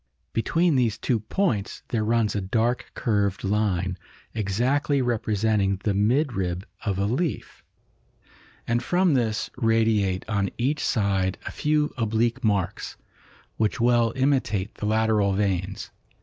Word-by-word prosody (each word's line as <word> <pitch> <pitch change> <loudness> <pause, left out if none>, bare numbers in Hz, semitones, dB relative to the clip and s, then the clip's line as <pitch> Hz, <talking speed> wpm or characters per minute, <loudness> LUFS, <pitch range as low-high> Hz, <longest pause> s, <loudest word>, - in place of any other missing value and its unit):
Between 165 +7 +2
these 115 -4 +1
two 120 -3 0
points 110 - -1
there 110 -3 0
runs 115 -1 +1
a 100 - 0
dark 115 +6 0
curved 100 -4 0
line, 95 -3 0 0.3
exactly 125 +8 +1
representing 110 -5 +1
the 105 - +1
midrib 100 - 0 0.2
of 100 -4 -1
a 100 - +1
leaf, 135 - -2 1.0
and 120 +1 +1
from 180 +1 +2
this 115 -4 0
radiate 110 -5 +1
on 100 -3 0
each 135 +5 0
side 100 -4 +1
a - - -4
few 150 0 0
oblique 115 +2 0
marks, 100 -5 -1 0.6
which 110 -2 0
well 120 -1 +3
imitate 130 -7 0
the 105 - -4
lateral 110 -2 +2
veins. 95 -1 -2
110 Hz, 125 wpm, -25 LUFS, 100-120 Hz, 1.0 s, well